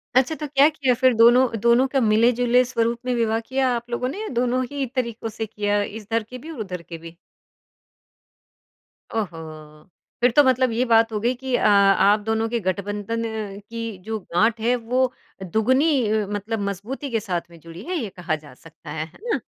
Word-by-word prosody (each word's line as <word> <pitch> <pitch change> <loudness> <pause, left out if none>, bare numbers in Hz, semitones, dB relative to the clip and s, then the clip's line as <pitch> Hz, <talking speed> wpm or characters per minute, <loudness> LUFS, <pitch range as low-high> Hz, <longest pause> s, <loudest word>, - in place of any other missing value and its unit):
अच्छा, 265 +5 +3
तो 300 - -5
क्या 280 +1 +5
किया 280 -5 +1
फिर? 255 +1 +3
दोनों 240 +3 +6
दोनों 235 +4 +4
का 270 0 0
मिले-जुले 240 +3 +3
स्वरूप 235 -1 -1
में 250 - 0
विवाह 225 -1 +1
किया 260 +3 0
आप 240 +1 -6
लोगों 240 +1 -2
ने, 400 +10 -6
या 440 - -4
दोनों 250 +1 +1
ही 280 -2 -2
तरीकों 235 -3 -2
से 220 +1 -5
किया, 205 -1 -1
इधर 220 +2 -3
के 250 +4 -10
भी 310 +6 -9
और 305 - -9
उधर 185 -5 -5
के 170 0 -9
भी? 165 +1 -12 2.0
ओहो! 160 -7 -6 0.3
फिर 245 +1 +4
तो 290 +5 +6
मतलब 260 -1 +2
ये 230 +2 +1
बात 225 -1 +4
हो 215 - -2
गई 240 +4 +1
कि 260 0 -2
अ, - - 0
आप 200 0 +5
दोनों 220 +1 -1
के 235 - -1
गठबंधन 205 +4 -2 0.5
की 230 -3 -5
जो 220 +1 -3
गाँठ 220 +6 +3
है, 240 +2 +2
वो 250 +2 0 0.3
दुगुनी 220 - +2
मतलब 210 +2 -3
मज़बूती 230 +9 -6
के 225 - +1
साथ 185 -5 -2
में 170 -1 -15
जुड़ी 165 +3 -11
है, 365 +8 -4
ये 230 -9 -3
कहा 175 -3 -3
जा 150 -3 -13
सकता 160 +2 -13
है। 155 +1 -3
है 160 - -18
ना? 475 -2 0
230 Hz, 195 wpm, -23 LUFS, 205-250 Hz, 2.0 s, दोनों